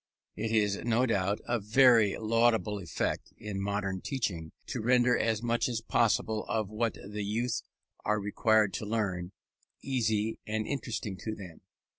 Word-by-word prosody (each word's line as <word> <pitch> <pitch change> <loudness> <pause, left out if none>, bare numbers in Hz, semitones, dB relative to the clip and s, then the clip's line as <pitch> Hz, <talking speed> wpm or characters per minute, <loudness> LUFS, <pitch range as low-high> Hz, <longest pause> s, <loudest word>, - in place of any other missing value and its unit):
It 110 +1 -2
is, 105 -3 +2
no 120 +3 +1
doubt, 100 -3 0
a 120 0 +1
very 110 -1 +5
laudable 110 -1 +2
effort, 90 -4 -1 0.2
in 105 -2 -5
modern 100 -2 -2
teaching, 90 - -3
to 125 - -4
render 125 +1 +4
as 110 0 0
much 120 +1 +1
as 115 -2 -1
possible 110 -1 +1
of 110 -3 -1
what 110 +1 -1
the 105 +1 -6
young 110 +5 -1 0.5
are 105 0 +1
required 105 0 +2
to - - -3
learn, 95 -5 -1 0.5
easy 110 -4 0
and 110 0 -1
interesting 115 -7 -3
to 110 +4 -4
them. 90 -6 -10
110 Hz, 150 wpm, -30 LUFS, 100-115 Hz, 0.5 s, very